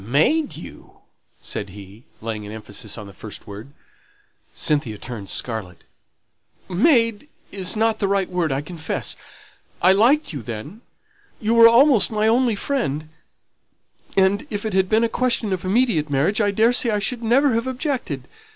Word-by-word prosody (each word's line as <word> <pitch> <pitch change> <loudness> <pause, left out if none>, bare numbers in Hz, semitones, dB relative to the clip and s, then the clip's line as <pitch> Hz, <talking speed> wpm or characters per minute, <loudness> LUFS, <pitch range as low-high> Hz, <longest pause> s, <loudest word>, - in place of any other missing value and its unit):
"Made 160 - +1
you!" - - -12 0.5
said 100 - -5
he, 100 +3 -13 0.2
laying 110 -1 -4
an 105 - -8
emphasis 110 -1 -7
on 105 - -7
the 100 - -12
first 105 +1 -10
word. 105 +6 -10 0.8
Cynthia 140 -8 -1
turned 110 -4 -7
scarlet. 105 -7 -4 0.8
"'Made' 230 - +2 0.2
is 190 +1 -2
not 220 0 +1
the 200 - +1
right 195 -1 +1
word, 175 -4 -1
I 135 +1 -1
confess. 160 +1 -4 0.6
I 185 - +5
liked 235 - +3
you 140 - -5
then 120 - -8 0.6
you 220 +1 0
were 230 0 +9
almost 245 -1 +5
my 215 0 +1
only 235 0 +3
friend 155 - -2 1.1
and, 195 +1 +3
if 205 0 -4
it 215 - -2
had 190 -1 +2
been 220 +1 +3
a - - +3
question 230 -4 0
of 185 - -3
immediate 190 - +1
marriage, 150 +11 +1
I 205 - +2
daresay 230 +4 +3
I 210 - +1
should 235 +4 -2
never 255 +4 +3
have 230 +3 -1
objected. 260 0 -3
200 Hz, 160 wpm, -22 LUFS, -, 1.1 s, were